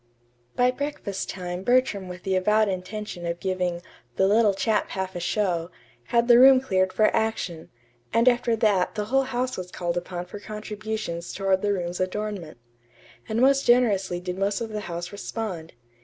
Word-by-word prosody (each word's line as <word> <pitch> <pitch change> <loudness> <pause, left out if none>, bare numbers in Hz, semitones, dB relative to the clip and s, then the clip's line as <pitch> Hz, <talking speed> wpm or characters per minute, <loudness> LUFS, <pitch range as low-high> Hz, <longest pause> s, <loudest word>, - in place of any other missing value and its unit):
By 250 0 +3
breakfast 255 -8 -4
time 180 -1 -5
Bertram 245 -5 +2
with 180 0 -9
the 190 -1 0
avowed 210 +3 +3
intention 185 0 -5
of 170 0 -3
giving 180 -2 -2 0.3
"the 190 - +3
little 210 -1 +4
chap 210 +3 0
half 190 -1 -4
a - - -3
show," 175 -2 -1 0.4
had 235 0 +2
the 240 -1 +7
room 265 0 +8
cleared 190 -7 +1
for 215 +2 +2
action; 185 -7 -2 0.4
and 230 +2 +2
after 240 -2 +3
that 205 -5 +2
the 210 - -2
whole 270 0 +4
house 255 0 -2
was 180 -1 -6
called 175 -1 -3
upon 175 0 -4
for 200 +3 -9
contributions 215 -4 -5
toward 190 -1 +1
the 205 - +1
room's 180 -2 -2
adornment. 185 - -3 0.7
And 220 +1 0
most 275 +1 +4
generously 205 -7 +3
did 180 +1 -5
most 200 +1 0
of 230 - -4
the 215 -1 -4
house 175 +1 -5
respond. 200 -5 -5
200 Hz, 170 wpm, -25 LUFS, 180-225 Hz, 0.7 s, room